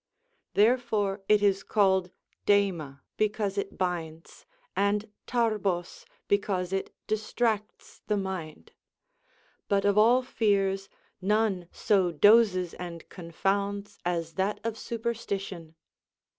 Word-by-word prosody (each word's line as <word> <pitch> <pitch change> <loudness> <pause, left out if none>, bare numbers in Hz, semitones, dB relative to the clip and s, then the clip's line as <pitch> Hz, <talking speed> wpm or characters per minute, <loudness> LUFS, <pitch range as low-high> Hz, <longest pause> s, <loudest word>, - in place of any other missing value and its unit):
Therefore 215 -3 +2
it 210 -1 +5
is 195 -1 +3
called 190 -3 +2 0.4
δεΐμα 175 -9 +1 0.2
because 210 -2 0
it 200 0 -2
hinds, 165 -3 -4 0.3
and 205 +1 +1 0.2
τύηβο^' 210 -7 -1 0.2
because 195 -2 0
it 195 - -2
distracts 215 0 -2
the 210 - +1
mind.* 190 -5 -5 1.0
But 200 0 +1
of 205 +1 +4
all 240 +4 +5
fears, 195 -5 0 0.3
none 200 -3 +1
so 190 -4 +2
dozes 190 0 +5
and 170 -2 -8
confounds 200 +3 -2
as 170 -2 -2
that 190 +4 -1
of 230 -1 -2
superstition. 200 -8 -4
200 Hz, 105 wpm, -28 LUFS, 180-210 Hz, 1.0 s, it